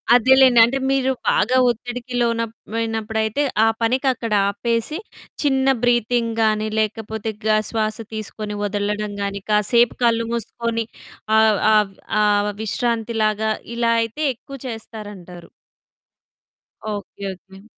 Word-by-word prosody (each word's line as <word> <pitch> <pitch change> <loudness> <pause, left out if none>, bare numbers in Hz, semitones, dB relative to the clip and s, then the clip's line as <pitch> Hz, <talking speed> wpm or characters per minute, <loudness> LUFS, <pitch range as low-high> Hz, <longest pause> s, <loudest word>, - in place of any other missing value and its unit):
అదేలెండి. 260 0 +6
అంటే 265 +3 -1
మీరు 265 -1 +2 0.2
బాగా 255 +4 +2
ఒత్తిడికి 245 +1 -5
లోన 235 -1 +3
లోనప్పుడైతే 220 +1 -3 0.2
ఆ - - +4
పనికక్కడ 245 -1 0 0.2
ఆపేసి, 230 +8 -2 0.4
చిన్న 270 -2 +2 0.2
బ్రీతింగ్‌ 240 -1 +2
గాని 215 0 +2
లేకపోతే, 220 0 -2
గ - - +1 0.2
శ్వాస 215 -1 -1 0.2
తీసుకొని 215 -1 -5
వదలడం 205 +1 -2
గాని, 200 0 -3
కాసేపు 230 +3 +3
కళ్ళు 230 -1 +3
మూసుకొని 230 0 -2 0.5
ఆహ్, 220 -2 +4 0.2
ఆబ్ 205 -2 +2 0.3
ఆహ్, 205 0 +2
విశ్రాంతిలాగా 220 -1 0 0.2
ఇలా 235 -1 +1
అయితే 230 +7 -6
ఎక్కువ 275 +4 -11
చేస్తారంటారు. 205 -6 -9 1.4
ఓకె. 200 -1 -7
ఓకె. 190 +1 -17
225 Hz, 110 wpm, -21 LUFS, 210-240 Hz, 1.4 s, అదేలెండి